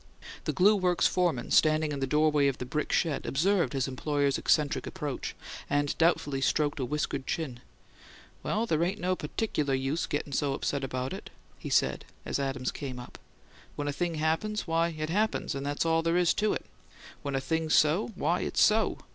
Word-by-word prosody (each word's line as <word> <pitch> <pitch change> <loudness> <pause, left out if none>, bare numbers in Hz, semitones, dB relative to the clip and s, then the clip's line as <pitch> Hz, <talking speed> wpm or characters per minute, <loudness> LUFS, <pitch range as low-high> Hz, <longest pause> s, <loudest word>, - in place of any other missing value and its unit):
The - - +1
glue 200 +3 +5
works 180 -3 +2
foreman, 170 -9 +1
standing 155 -1 +4
in 140 - -3
the 135 - -1
doorway 150 0 +3
of 135 - 0
the 125 - -5
brick 150 +4 -2
shed, 155 -5 0
observed 175 +6 +2
his 135 -1 0
employer's 140 +1 0
eccentric 150 0 +1
approach, 150 -8 -4 0.3
and 145 0 +1
doubtfully 145 -5 +2
stroked 145 +2 +1
a 130 - 0
whiskered 140 -1 -2
chin. 135 -7 -3 0.8
"Well, 220 +2 0
they 165 -6 +1
ain't 190 +4 -1
no 185 -1 0
putticular 150 -4 -1
use 135 +5 -1
gettin' 145 0 -3
so 140 0 0
upset 140 0 -2
over 130 0 -3
it," - - -9 0.3
he - - -6
said, - - +1 0.2
as - - -2
Adams 135 -2 -2
came 130 -3 -6
up. 125 - -10 0.6
"When 145 - -3
a 145 - -1
thing 170 +2 -2
happens, 165 +8 -1
why, 165 0 +2
it 155 -1 -4
happens, 215 +4 0
and 140 0 -4
that's 145 +3 -1
all 165 0 +3
there 165 +1 +1
is 175 -2 +4
to 215 0 +1
it. - - -4 0.6
When 140 -2 -3
a - - +2
thing's 160 +3 0
so, 155 +7 +3
why, 175 0 +1
it's - - -2
so. 215 +1 +3
150 Hz, 190 wpm, -29 LUFS, 140-170 Hz, 0.8 s, glue